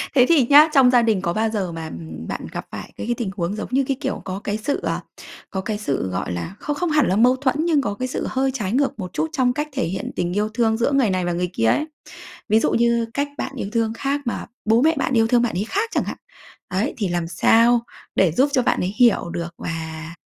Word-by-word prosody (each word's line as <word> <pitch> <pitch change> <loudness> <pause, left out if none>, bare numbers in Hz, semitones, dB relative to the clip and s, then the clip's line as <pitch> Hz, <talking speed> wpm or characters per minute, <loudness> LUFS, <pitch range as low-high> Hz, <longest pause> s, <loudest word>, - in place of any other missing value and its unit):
Thế 250 -2 +6
thì 285 -8 +4
nhá, 295 +2 +8
trong 265 -3 +6
gia 245 -1 +5
đình 220 -5 +1
có 170 -2 -1
bao 220 +3 +1
giờ 200 -5 -2
mà, 165 -1 -6
ừm, 80 -1 -8
bạn - - -4
gặp - - -5
phải - - -8
cái - - -6
cái 240 - 0
tình 230 -5 -2
huống, 175 +3 -1
giống - - -5
như 270 +2 +2
cái, 270 -2 -1
kiểu, - - -3
có 185 0 -4
cái 205 0 -2
sự, 245 +7 -2
ờ, - - -1 0.5
có 190 - -3
cái 210 +1 -3
sự, 140 - -2
gọi 90 0 -3
là, 90 - -5
không 295 - -3
không 350 +3 -1
hẳn 300 -1 +3
là 185 - +1
mâu 245 +4 +5
thuẫn, 260 -1 0
nhưng 315 -4 +3
có 205 -6 -2
cái 255 +4 -3
sự 255 - -3
hơi 265 +1 0
trái 210 -7 -3
ngược 270 -1 0
một 180 -1 -6
chút 320 - -1
trong 255 -4 +2
cách 295 +3 -2
thể 265 -1 -1
hiện 185 +3 -4
tình 175 0 -1
yêu 210 +2 0
thương 225 -1 +1
giữa 235 +4 +1
người 270 -6 +3
này 185 -1 0
và 175 - -1
người 180 +1 -1
kia 115 - 0
ấy? 295 - +2 0.6
Ví 220 - +5
dụ - - +1
như 235 0 +2
cách 285 +1 0
bạn - - -3
yêu 200 - -4
thương 225 -1 0
khác 280 +4 -2
mà 235 - -3 0.2
bố 225 +2 +4
mẹ 320 +3 +4
bạn 270 - -1
yêu 225 -2 +4
thương 240 +1 +3
bạn 240 -2 0
ấy 195 - 0
khác 430 +3 0
chẳng - - +1
hạn. - - -5 0.5
Ấy, 190 +4 -1
thì 205 - -1
làm 175 -1 -2
sao 230 +8 +4 0.4
để 185 -4 +4
giúp 265 - +2
cho 255 - +4
bạn - - +1
ấy 185 +2 -2
hiểu 235 -8 +4
được 170 0 -5
và, 160 0 -6
225 Hz, 270 wpm, -22 LUFS, 185-260 Hz, 0.6 s, nhá